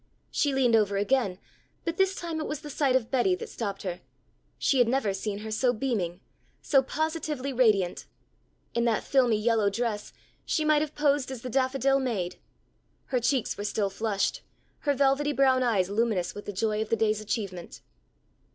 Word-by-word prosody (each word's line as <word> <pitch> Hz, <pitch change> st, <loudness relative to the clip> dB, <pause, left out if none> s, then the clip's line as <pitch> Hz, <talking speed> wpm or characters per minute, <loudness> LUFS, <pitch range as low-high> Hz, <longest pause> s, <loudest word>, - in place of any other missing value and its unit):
She 290 Hz, -, +1 dB
leaned 255 Hz, -4 st, +3 dB
over 205 Hz, -2 st, +2 dB
again, 205 Hz, -2 st, +1 dB, 0.5 s
but 335 Hz, 0 st, -2 dB
this 385 Hz, 0 st, +2 dB
time 335 Hz, -2 st, -4 dB
it -, -, -3 dB
was 300 Hz, -1 st, -4 dB
the 300 Hz, -1 st, -8 dB
sight 270 Hz, -2 st, +2 dB
of 240 Hz, -3 st, 0 dB
Betty 275 Hz, +8 st, +3 dB
that 460 Hz, +4 st, -8 dB
stopped 200 Hz, -4 st, -4 dB
her. 180 Hz, -2 st, -4 dB, 0.6 s
She 270 Hz, -, +2 dB
had 245 Hz, -, +5 dB
never 235 Hz, -5 st, +1 dB
seen 200 Hz, +1 st, -3 dB
her 220 Hz, -, -5 dB
so 245 Hz, +3 st, +2 dB
beaming, 205 Hz, -8 st, -2 dB, 0.4 s
so 275 Hz, -3 st, +3 dB
positively 300 Hz, -1 st, -2 dB
radiant. 210 Hz, -8 st, +2 dB, 0.7 s
In 235 Hz, 0 st, +1 dB
that 230 Hz, -2 st, +1 dB
filmy 250 Hz, -5 st, +3 dB
yellow 220 Hz, -2 st, +2 dB
dress, 210 Hz, 0 st, -3 dB, 0.3 s
she 310 Hz, -, 0 dB
might 305 Hz, -1 st, +4 dB
have 305 Hz, 0 st, -3 dB
posed 290 Hz, -3 st, +2 dB
as 260 Hz, -3 st, -7 dB
the 250 Hz, -, -5 dB
Daffodil 270 Hz, +1 st, +2 dB
Maid. 215 Hz, -9 st, -2 dB, 0.7 s
Her 255 Hz, -, 0 dB
cheeks 245 Hz, -2 st, 0 dB
were -, -, -3 dB
still 205 Hz, -1 st, -1 dB
flushed, 205 Hz, 0 st, -1 dB, 0.4 s
her 285 Hz, -1 st, 0 dB
velvety 280 Hz, +2 st, +2 dB
brown 265 Hz, -2 st, +4 dB
eyes 215 Hz, -7 st, +2 dB
luminous 205 Hz, -5 st, 0 dB
with 205 Hz, -, -9 dB
the -, -, -4 dB
joy 210 Hz, +2 st, 0 dB
of 220 Hz, -, -3 dB
the -, -, +3 dB
day's 215 Hz, -1 st, +1 dB
achievement. 200 Hz, -5 st, -5 dB
245 Hz, 180 wpm, -28 LUFS, 210-275 Hz, 0.7 s, had